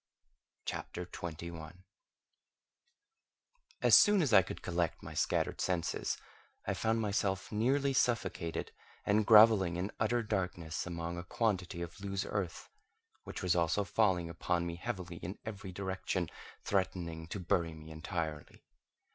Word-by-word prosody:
CHAPTER 90 - -4
21 85 +1 -7 2.0
As - - +8
soon 205 -4 +7
as 130 -7 +1
I 95 - +9
could 95 - -7
collect 85 -2 -1
my - - -7
scattered - - 0
senses, 85 -3 -1 0.5
I - - 0
found 115 0 +1
myself 100 -2 0
nearly 135 +6 +2
suffocated, 95 -10 0 0.3
and 105 +1 +3
grovelling 105 -5 +7
in 90 +4 -2
utter 115 +2 +2
darkness 90 -6 -2
among 85 0 -4
a - - -5
quantity 90 -3 -1
of 85 +3 -9
loose 100 -1 -2
earth, 95 -5 -3 0.6
which - - -6
was 90 -1 +3
also 85 +4 +2
falling 95 -3 +2
upon 85 +1 -1
me 85 0 -4
heavily 90 -4 -5
in 90 +4 -6
every 100 -3 -6
direction, 95 -2 -2 0.3
threatening 85 -4 -1
to 95 - -5
bury 85 -3 0
me 80 0 -11
entirely. 80 -2 -4
90 Hz, 130 wpm, -33 LUFS, 85-105 Hz, 2.0 s, I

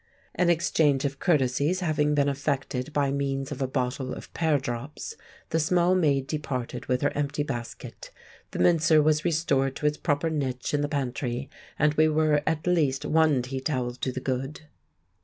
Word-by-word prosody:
An 180 -1 +2
exchange 155 -4 +2
of 140 -1 -3
courtesies 150 +3 +1
having 150 -3 +1
been 140 -1 +3
effected 140 -1 -2
by 145 -2 +1
means 135 0 -2
of 140 - -5
a 135 - +1
bottle 130 0 -2
of - - -11
pear 160 -3 +2
drops, 135 - -5 0.4
the 160 - +2
small 175 +3 +3
maid 145 -7 +2
departed 135 -5 -4
with 125 -1 0
her 145 - +2
empty 145 0 -1
basket; 120 -5 -7 0.4
the - - -7
mincer 160 -2 +4
was 150 0 +3
restored 140 -5 +1
to - - -5
its 150 0 +2
proper 155 +1 0
niche 130 -4 -2
in 145 - +2
the 145 - -1
pantry, 130 -2 -3 0.3
and 150 0 +3
we 155 +1 +4
were 155 -1 +2
at 160 -1 0
least 155 -7 +1
one 155 -5 +3
tea 130 +1 -4
towel 130 -3 -1
to 130 +1 -3
the 130 - -4
good. 135 +3 -3
145 Hz, 175 wpm, -26 LUFS, 135-155 Hz, 0.4 s, mincer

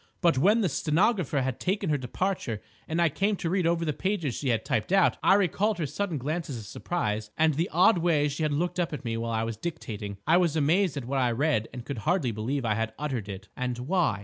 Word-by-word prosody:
But 170 -3 +3
when 210 - +4
the 195 - +2
stenographer 155 - +1
had 130 -1 -2
taken 190 -4 0
her 145 - +2
departure 130 - -2 0.3
and 160 +2 -1
I 170 - +5
came 200 +7 0
to 170 -3 -3
read 185 -3 +2
over 170 0 +1
the 150 - 0
pages 180 - -1
she 135 - -2
had 115 -2 0
typed 110 +9 -1
out, 195 -2 +4
I 195 - +5
recalled 205 +2 +1
her 165 - -1
sudden 175 +3 -2
glances 150 0 -3
of 110 - -8
surprise 105 -5 -3
and 160 0 +4
the 165 +5 -1
odd 180 +4 +5
way 160 -4 +2
she 145 +2 -4
had 155 -1 +1
looked 175 +5 -1
up 170 -3 0
at 145 - -6
me 115 -1 -1
while 115 0 -3
I 110 0 0
was 115 -1 -3
dictating. 105 -10 -5
I 165 +3 +5
was 170 -4 +2
amazed 160 +2 +2
at 135 - -4
what 135 +2 -1
I 125 -2 +2
read 120 -3 +1
and 125 -1 -8
could 135 -4 -4
hardly 155 - +1
believe 120 +5 -2
I 110 - +2
had 115 0 -2
uttered 130 -9 -3
it." 100 +1 -8
"And 125 -1 -2
why?" 160 - +1
150 Hz, 245 wpm, -27 LUFS, 120-175 Hz, 0.3 s, I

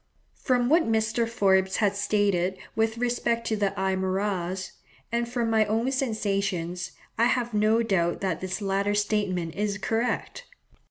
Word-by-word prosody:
From 245 -3 +2
what 315 -4 +3
Mr. 225 +1 +1
Forbes 190 -4 +2
has 205 -2 +2
stated 195 -3 +1 0.2
with 225 0 +1
respect 235 -1 0
to 220 - 0
the 205 -2 +1
Aymaras, 190 -1 -1 0.4
and 235 0 -1
from 240 -1 -1
my 220 -1 +4
own 225 +5 0
sensations, 195 -8 -1 0.3
I 230 - +5
have 240 -1 0
no 215 +2 +3
doubt 175 -6 +1
that 185 -4 -1
this 190 +2 -3
latter 200 +1 0
statement 205 -5 0
is 205 +3 -1
correct. 230 - -2
210 Hz, 145 wpm, -26 LUFS, 190-230 Hz, 0.4 s, I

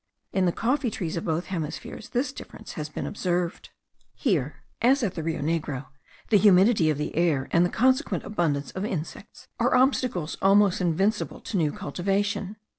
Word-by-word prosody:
In 190 -2 +2
the - - +3
coffee 250 +6 0
trees 175 -6 -4
of 165 - -3
both 165 +1 -1
hemispheres 170 +3 -5
this 255 +3 -1
difference - - -10
has 150 -1 -5
been - - -5
observed. 175 -3 -2 0.5
Here, 155 - -1 0.2
as 260 +3 +4
at 200 - 0
the 165 - -4
Rio 160 0 -2
Negro, 145 -3 -2 0.5
the 210 - +6
humidity 190 -2 +5
of 150 - 0
the 150 - -4
air, 155 -6 +1
and 170 - +4
the 175 - +2
consequent 260 - +1
abundance 150 -8 -1
of 190 - -4
insects, 175 -6 -6
are - - +3
obstacles 250 - +1
almost 195 -1 +4
invincible 190 +5 0
to - - -6
new 160 -5 +2
cultivation. 200 +6 -2
180 Hz, 170 wpm, -26 LUFS, 160-210 Hz, 0.5 s, the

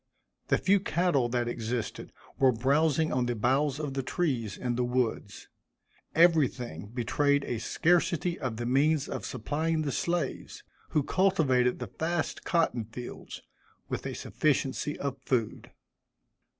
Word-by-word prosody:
The - - +3
few 200 +1 +3
cattle 170 -9 +1
that 120 0 0
existed, 115 -1 -4 0.3
were 135 -1 +6
browsing 145 +6 +2
on 125 -1 +1
the 120 - -1
boughs 135 +5 +1
of 145 -3 -3
the 135 - -1
trees, 125 - -1
in 125 -1 -2
the 125 - 0
woods. 120 -4 -2 0.7
Everything 135 - +2
betrayed 140 +5 +1
a 120 - -3
scarcity 170 - +1
of 120 -4 -3
the 120 - -3
means 140 +4 +2
of - - -5
supplying 155 +6 -1
the 145 - -1
slaves, 170 +1 -2 0.3
who 150 - +1
cultivated 135 -10 +2
the 125 -6 -7
vast 165 0 -1
cotton 160 -9 +1
fields, 120 +3 -9 0.5
with - - -3
a - - -5
sufficiency 145 0 -1
of 140 -2 -4
food. 115 -5 -1
135 Hz, 135 wpm, -29 LUFS, 120-160 Hz, 0.7 s, were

